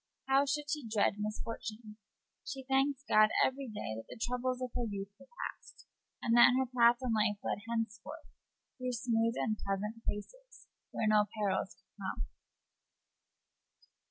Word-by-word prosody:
How 270 +1 +4
should 295 +1 -1
she 295 -6 -2
dread 215 -2 +2
misfortune? 215 0 -5 0.5
She 270 -2 -6
thanked 270 +1 +1
God 215 0 +6 0.2
every 270 +1 -2
day 210 - -4
that 115 - -7
the - - -9
troubles 250 +2 -1
of 255 -1 -3
her 245 - -1
youth 200 -1 -5
were 270 - -15 0.2
past, - - -9 0.4
and 230 - +3
that 240 +1 +8
her 265 - +2
path 240 -1 +5
in 245 -3 +1
life 210 -1 +2
led - - -1
henceforth 230 +7 -3 0.5
through 255 0 -2
smooth 230 -1 +1
and 215 -2 0
pleasant 210 +3 -3
places, - - -6 0.2
where - - -2
no 215 -1 +5
perils 195 -3 0
could 190 +2 -22
come. 75 - -3
230 Hz, 155 wpm, -33 LUFS, 210-260 Hz, 0.5 s, that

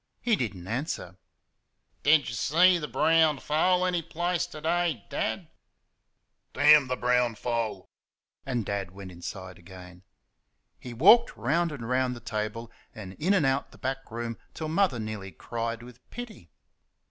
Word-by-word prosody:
He 235 -3 +2
did 115 - -3
n't 90 0 -11
answer. 115 - -4 0.9
"Did 145 -2 +4
y' 120 - -4
see 175 +9 +4
the 150 - -4
brown 160 -2 +3
foal 180 +6 +2
any 180 -2 0
place 175 +2 -2
ter 155 - -10
day, 165 -6 0
Dad?" - - -2 1.1
"Damn 145 0 +6
the 130 - -1
brown 125 -2 +1
foal!" 115 -4 -3 0.6
and 125 -5 -2
Dad 100 -2 -3
went 95 0 -10
inside 90 +2 -8
again. 90 0 -13 0.8
He 125 - -9
walked 200 - +5
round 160 +9 +1
and 125 -6 -6
round 125 0 0
the - - -9
table 110 +1 -4 0.2
and 95 -4 -8
in 190 +6 +2
and 175 -7 +2
out 135 +1 0
the - - -16
back 135 0 -4
room 115 0 -5 0.2
till 155 -1 -4
Mother 165 -5 +2
nearly 110 -3 -5
cried 115 +2 -5
with 125 -1 -13
pity. 225 - -9
125 Hz, 155 wpm, -27 LUFS, 110-160 Hz, 1.1 s, Damn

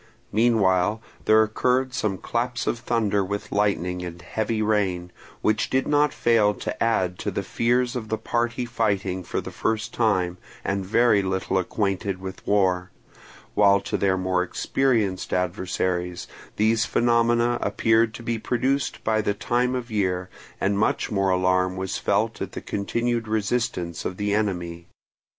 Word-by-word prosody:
Meanwhile 105 -3 +3 0.3
there 110 0 +6
occurred 125 +4 +1
some 105 -5 -1
claps 120 +4 -2
of 120 - -1
thunder 110 -4 +1
with 100 +1 -4
lightning 90 -3 0
and 85 -1 -7
heavy 110 +5 -2
rain, 95 -5 0 0.3
which 110 0 +1
did 130 0 +1
not 145 -1 +3
fail 110 -3 +3
to - - -5
add 95 -6 +1
to - - -2
the - - -3
fears 120 +2 +1
of 110 -3 -4
the 110 - 0
party 120 +2 -1
fighting 100 -6 -1
for - - -3
the - - -8
first 110 +1 -2
time, 90 -6 +1 0.3
and 100 0 -1
very 110 +1 +3
little 95 0 0
acquainted 100 0 -1
with 95 0 -8
war; 95 -3 +2 0.6
while 100 -1 +5
to - - -3
their 95 -1 +2
more 95 0 +1
experienced 105 0 0
adversaries 90 -1 -1 0.3
these 110 +1 +3
phenomena 120 0 +2
appeared 115 0 +2
to 115 - -9
be 115 -1 -2
produced 130 +4 -1
by 110 -1 +2
the 100 -1 -1
time 120 +4 0
of 120 -2 -5
year, 95 -3 -1 0.3
and 100 +1 +1
much 110 - 0
more 100 -2 +1
alarm 90 0 +2
was 95 0 -3
felt - - 0
at - - -4
the - - -4
continued 115 +3 -1
resistance 110 -5 -1
of 90 - -4
the 105 0 0
enemy. 90 -5 -2
105 Hz, 155 wpm, -24 LUFS, 95-115 Hz, 0.6 s, there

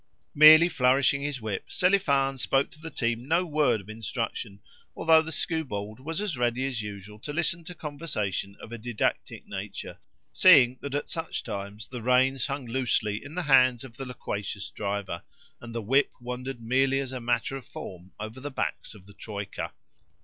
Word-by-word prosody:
Merely 155 +3 +9
flourishing 135 -2 +3
his 145 -2 -3
whip, 110 -3 -4
Selifan 140 -8 +2
spoke 135 +3 +1
to 150 - -14
the 165 - -6
team 120 -2 -2
no 170 +4 +2
word 150 -8 +2
of 95 - -18
instruction, 110 -1 -4 0.4
although 160 -1 +5
the 160 0 -6
skewbald 125 - -3
was 160 +6 -4
as 205 -6 -1
ready 120 +2 +1
as 130 -4 -2
usual 105 0 -8
to 145 - -6
listen 170 +2 0
to 180 - -7
conversation 140 - -3
of 110 - -11
a 120 - -6
didactic 120 -1 -2
nature, - - -6 0.3
seeing 125 0 +7
that 140 0 -4
at 145 - -3
such 165 -1 -3
times 100 -1 -6
the 125 -2 -7
reins 130 +2 +3
hung 140 -2 -4
loosely 115 -4 0
in 145 +3 -10
the 180 - -1
hands 130 -4 +5
of 125 -2 -12
the 135 - -5
loquacious 100 -5 -5
driver, 100 -4 -3 0.4
and 120 -1 -9
the 115 - -2
whip 135 +7 +3
wandered 125 +1 -5
merely 135 +4 +2
as 135 -2 -3
a 130 - -4
matter 120 +3 0
of 135 - -6
form 90 0 -9
over 110 +4 -6
the 145 +2 -5
backs 130 - -3
of 95 -3 -15
the 100 - -15
troika. 100 -1 -6
125 Hz, 180 wpm, -27 LUFS, 110-145 Hz, 0.4 s, Merely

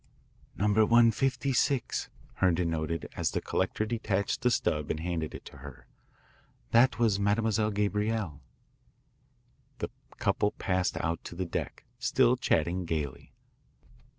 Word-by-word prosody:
"Number 105 +2 +3
156," 125 +3 +2 0.3
Herndon 85 -2 +2
noted 80 0 -2
as - - 0
the - - -1
collector 95 +3 -1
detached 105 -3 -1
the 125 - +3
stub 75 -10 0
and 80 - -1
handed 80 -2 -3
it - - -9
to - - -11
her. 70 -1 -11 0.9
"That 120 +1 +5
was 110 -4 +2
Mademoiselle 105 +1 +1
Gabrielle." 105 -5 -1 1.4
The - - -4 0.3
couple 105 - +1
passed 90 -2 -1
out 85 0 -2
to - - -7
the 95 +1 -2
deck, 85 - -5
still 125 +1 +3
chatting 90 -6 0
gaily. 75 -5 -4
100 Hz, 125 wpm, -29 LUFS, 85-115 Hz, 1.4 s, That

